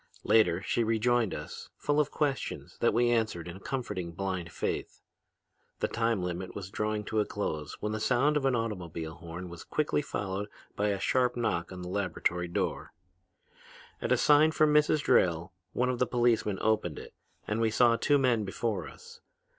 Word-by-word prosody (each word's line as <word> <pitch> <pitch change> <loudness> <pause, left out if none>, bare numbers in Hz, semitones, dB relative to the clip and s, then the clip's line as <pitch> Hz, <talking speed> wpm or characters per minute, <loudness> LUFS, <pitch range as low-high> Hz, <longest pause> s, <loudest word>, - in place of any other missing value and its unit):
Later 95 -5 +4
she 120 - +1
rejoined 115 -1 +2
us, - - -7
full 145 0 +1
of 150 -1 +2
questions 145 -3 -2
that - - +3
we 120 +2 +3
answered 110 -8 0
in 90 +1 -7
a - - -13
comforting 100 -9 -4
blind 90 -1 -3
faith. - - -3 0.8
The - - +1
time 115 -4 0
limit 90 +1 -4
was 95 -2 -6
drawing 105 0 -1
to 110 - -1
a 105 - +2
close 75 -7 -3
when 105 - -1
the 110 - -2
sound 130 +6 +2
of 150 - +1
an 135 -2 +3
automobile 85 -8 -3
horn 85 +2 -8
was 85 -1 -9
quickly 150 -1 0
followed 100 -5 -3 0.3
by 105 - +1
a 100 -2 0
sharp 125 +3 +1
knock 85 -8 -1
on 90 -1 -7
the - - -6
laboratory 90 -2 -1
door. 85 - -2 1.1
At - - -2
a - - +5
sign 150 +1 +6
from 155 -1 +3
Mrs. 150 0 +4
Drayle 85 -1 +3 0.2
one 125 +1 +1
of 125 - -4
the 125 - +2
policemen 120 -5 +2
opened 105 -8 +1
it - - -9 0.3
and 105 +2 -1
we 115 - +3
saw 115 +1 +4
two 145 +4 +3
men 125 -5 +2
before 100 -3 -2
us. - - -14
110 Hz, 185 wpm, -30 LUFS, 90-120 Hz, 1.1 s, sign